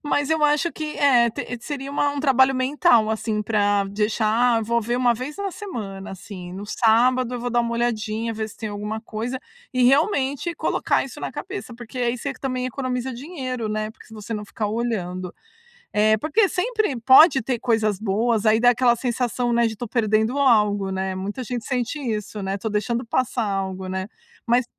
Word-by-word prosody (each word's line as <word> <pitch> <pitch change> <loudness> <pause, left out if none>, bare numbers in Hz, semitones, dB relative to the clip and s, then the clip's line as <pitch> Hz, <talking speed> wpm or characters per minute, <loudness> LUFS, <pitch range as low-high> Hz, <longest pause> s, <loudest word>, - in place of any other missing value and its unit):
Mas 290 -1 0
eu 315 -1 +2
acho 300 +3 +2
que 305 -1 -5
eh, 245 -5 +5
t 245 +2 -5
seria 280 0 -5
um 285 -1 0
trabalho 265 -1 +4
mental, 255 -4 +3
assim 220 -1 -1
pra 205 -2 +2
deixar 220 +3 +2
envolver 235 +1 0
uma 245 -1 +3
vez 255 +6 -6
na 400 -1 -3
semana 215 - -7
assim, 185 -2 -9
no 195 +2 -6
sábado 245 +3 +3
eu 245 - -4
vou 245 +1 -3
dar 240 0 +2
uma 235 0 -2
olhadinha, 230 -1 -1
ver 220 0 -3
se 210 - -14
tem 220 - -5
alguma 210 +2 -4
coisa 235 +3 -4 0.3
e 255 0 +1
realmente 280 +2 +2
colocar - - 0
isso - - -10
na - - -3
cabeça, 380 -11 -6
porque 240 +1 -9
aí 240 0 0
você 280 +2 -3
também 255 -2 -3
economiza 255 0 -3
dinheiro, 255 -4 -5
né? 215 0 -2
Porque - - -17
se 225 - -14
você 215 +1 -6
não 210 0 -4
ficar 210 +1 -3
olhando. 190 -5 -3 0.6
É, 215 +1 +4
porque 350 - +2
sempre 425 - -1
pode 265 +3 +7
ter 245 -2 -1
coisas 220 -5 +1
boas 220 +2 0
aí 215 +1 +5
dá 245 +1 +6
aquela 245 -1 +3
sensação, 245 0 -1
né, 235 0 +3
de 220 - -5
tô 235 +2 -6
perdendo 220 +2 +1
algo, 210 -7 +3
né? 190 0 -2
Muita 205 +7 -4
gente 240 -1 -4
sente 250 +3 -2
isso, 210 -5 -4
né? 195 +1 -2
Tô 220 - -5
deixando 230 +4 -1
passar 245 0 0
algo, 190 -1 -3
né? 190 +1 -3 0.4
Mas 245 +1 +3
235 Hz, 190 wpm, -23 LUFS, 215-260 Hz, 0.6 s, pode